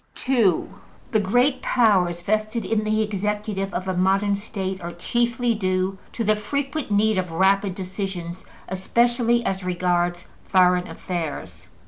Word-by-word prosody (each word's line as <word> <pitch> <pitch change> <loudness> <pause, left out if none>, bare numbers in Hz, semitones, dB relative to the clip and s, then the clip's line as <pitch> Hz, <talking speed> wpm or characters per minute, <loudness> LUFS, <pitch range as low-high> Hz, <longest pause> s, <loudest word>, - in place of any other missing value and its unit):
(2) 230 -10 +2 0.4
The 220 - +3
great 245 +7 +2
powers 185 -8 +2
vested 215 +3 -1
in 220 -1 0
the 215 0 +1
executive 210 -1 -2
of 185 +2 -4
a 185 - -1
modern 195 +2 +2
State 195 -2 -4
are 170 0 -6
chiefly 240 +6 0
due 185 -2 -1
to 230 - -2
the 215 0 +3
frequent 280 +6 -3
need 210 0 +3
of 180 -1 -3
rapid 190 +3 +2
decisions, 185 -2 -5 0.2
especially 235 +5 +1
as 190 0 -1
regards 175 -1 0 0.2
foreign 180 -1 +3
affairs. 120 - -5
195 Hz, 135 wpm, -23 LUFS, 180-220 Hz, 0.4 s, The